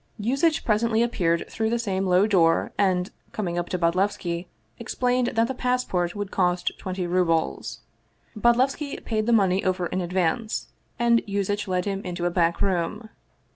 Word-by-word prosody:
Yuzitch 275 +9 +1
presently 225 +1 +2
appeared 170 -8 0
through 220 0 -2
the 235 - +1
same 195 -4 -1
low 180 +2 +4
door 170 -6 +3
and, 185 -1 +1 0.2
coming 180 -5 -2
up 175 - -4
to 180 - -1
Bodlevski, 175 0 0 0.3
explained 250 0 0
that 225 +1 +3
the 265 - -3
passport 250 -9 -1
would 205 -1 -4
cost 180 -1 +1
twenty 185 -1 -3
rubles. 175 -2 0 0.5
Bodlevski 255 +6 +1
paid 215 -1 -1
the - - +3
money 195 -4 +3
over 185 -1 0
in 185 +2 -2
advance, 180 +5 -1 0.3
and 235 -1 +3
Yuzitch 200 +1 -1
led 180 -1 0
him 195 -1 -2
into 175 -1 -4
a 175 - +1
back 170 -1 +1
room. 195 +4 -1
195 Hz, 160 wpm, -25 LUFS, 180-230 Hz, 0.5 s, low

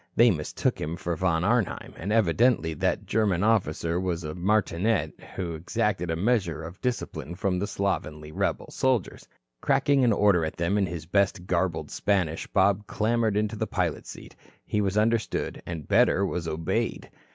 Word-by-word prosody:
They 120 0 +6
mistook 75 -5 -2
him 80 +3 -3
for 85 0 -3
Von 85 0 +1
Arnheim 115 0 0
and 100 +5 -4
evidently 110 -3 +3
that 75 - -1
German 100 -4 +1
officer 90 -6 +1
was 90 -2 -2
a 75 0 -4
martinet 100 +2 +1 0.2
who 90 -3 -3
exacted 85 +1 -1
a 80 - 0
measure 90 -5 0
of 85 +4 -9
discipline 85 - -3
from 90 0 -1
the 100 - -1
slovenly 75 -7 -3
rebel - - -2
soldiers. 130 -7 -1 0.3
Cracking 140 0 +3
an 120 - +4
order 100 -5 +3
at 80 - -4
them 85 +3 0
in 95 - +1
his 85 -2 -6
best 95 0 +1
garbled 90 -3 -1
Spanish, 90 -6 0
Bob 100 +1 +2
clambered 110 -1 +1
into 105 0 0
the - - -2
pilot's - - -2
seat. - - -11 0.3
He 105 - 0
was 100 0 0
understood, 110 +1 0
and 80 -4 -6
better, 100 - +4
was 90 -3 -3
obeyed. 80 0 -2
95 Hz, 165 wpm, -26 LUFS, 85-105 Hz, 0.3 s, They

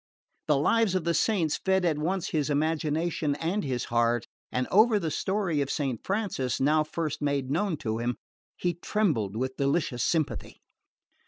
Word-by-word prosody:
The 150 - +4
Lives 205 +7 +2
of 185 - 0
the 170 +1 +1
Saints 170 -6 +1
fed 190 -1 +2
at 155 -3 +1
once 180 +4 -1
his 150 -3 0
imagination 155 0 0
and 175 +7 -1
his 125 -3 -2
heart, 120 0 +2 0.3
and 125 0 -1
over 215 +2 +5
the 165 -6 -2
story 190 -6 0
of 140 - -2
Saint 135 -7 -2
Francis, 195 - -1
now 155 +3 +3
first 155 -1 -3
made 140 -2 0
known 175 +2 0
to 110 0 -1
him, 120 +1 -1 0.4
he 175 -1 0
trembled 155 - 0
with 130 +3 -2
delicious 140 -3 0
sympathy. 160 -3 -1
155 Hz, 165 wpm, -28 LUFS, 135-180 Hz, 0.4 s, over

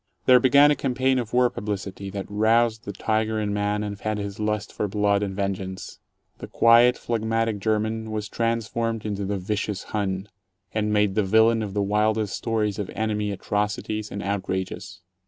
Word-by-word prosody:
There 125 -1 +7
began 140 +4 +6
a - - +3
campaign 130 -1 +1
of 115 -3 -4
war 125 0 +3
publicity 100 -3 -5
that 95 0 -5
roused 110 +2 +2
the 100 - -4
tiger 110 +2 -1
in 105 -1 -1
man 105 0 0
and 100 -1 -5
fed 110 0 -2
his 100 -1 -5
lust 105 -1 -2
for 105 - -2
blood 100 0 +1
and 100 -2 -3
vengeance. 95 -1 -4 0.4
The - - -7
quiet, 120 +2 +5
phlegmatic 115 -1 -1
German 110 +1 -1
was 105 -1 -3
transformed 115 0 -2
into 100 -2 -2
the 100 +1 -2
"Vicious 100 +1 -3
Hun," 95 -2 -2 0.5
and 105 -1 0
made 105 -2 +2
the 110 - +2
villain 110 +3 +4
of 105 -2 -5
the 100 - +1
wildest 105 +1 +1
stories 110 -3 -1
of 100 - -3
"enemy" 105 0 -1
atrocities 105 +2 -2
and 100 - -5
outrages. 95 -3 -4
105 Hz, 175 wpm, -24 LUFS, 100-110 Hz, 0.5 s, There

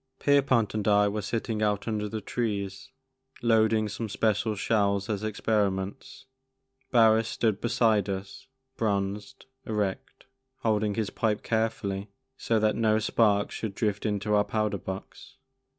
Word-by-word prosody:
Pierpont 135 -6 +3
and 110 -1 -2
I 105 0 +5
were 105 +1 -2
sitting 110 +1 -2
out 105 0 0
under 105 -2 -2
the 110 0 -4
trees, 100 -5 -3 0.5
loading 110 -1 +3
some 110 +2 -5
special 110 +1 0
shells 100 0 +1
as 105 0 -3
experiments; 105 +3 -2 0.6
Barris 115 -2 +5
stood 110 -4 0
beside 115 -4 +2
us, 95 0 -6 0.3
bronzed, 100 +2 -2 0.2
erect, 105 -3 -3 0.4
holding 105 -2 +1
his 110 -3 -2
pipe 110 -2 -1
carefully 105 -3 -1 0.3
so 115 -3 0
that 110 0 +2
no 110 -1 +2
sparks 105 -1 +2
should 105 -3 -4
drift 105 -2 -1
into 105 -1 -1
our 105 0 +4
powder 105 -2 -1
box. 95 +2 -8
105 Hz, 135 wpm, -27 LUFS, 100-110 Hz, 0.6 s, I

